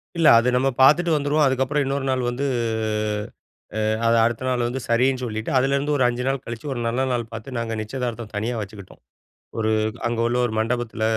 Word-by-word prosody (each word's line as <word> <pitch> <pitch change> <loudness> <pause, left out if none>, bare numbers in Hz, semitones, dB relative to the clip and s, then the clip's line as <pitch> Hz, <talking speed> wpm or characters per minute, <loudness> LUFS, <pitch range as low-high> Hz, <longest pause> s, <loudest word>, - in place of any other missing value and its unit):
இல்ல. 165 -2 +3
அது 125 +2 +1
நம்ம 135 +2 +2
பாத்துட்டு 165 +5 +5
வந்துருவோம், 150 +1 +1
அதுக்கப்பறம் 135 +2 +1
இன்னொரு 135 0 -2
நாள் 130 -1 +1
வந்து 130 +4 -3 1.4
அ - - +1 0.2
அத 115 - +4
அடுத்த 120 +1 -2
நாள் 125 -1 0
வந்து, 130 +2 -3
சரின்னு 130 +2 +2
சொல்லிட்டு 110 -1 -4
அதிலருந்து, 140 +3 +1
ஒரு 130 - +2
5 125 +1 -2
நாள் 135 -1 -1
கழிச்சு 115 +4 -7
ஒரு 120 - -4
நல்ல 125 +3 0
நாள் 120 -1 -1
பார்த்து, 115 +4 -7
நாங்க 115 -1 -3
நிச்சயதார்த்தம் 120 -1 -5
தனியா 115 +4 -1
வச்சுக்கிட்டோம். 100 -1 -10 0.6
ஒரு 110 0 +1 0.4
அங்க 120 -1 -3
உள்ள 120 +1 0
ஒரு 110 - -5
மண்டபத்துல. 115 -1 -2
125 Hz, 185 wpm, -23 LUFS, 115-135 Hz, 1.4 s, பாத்துட்டு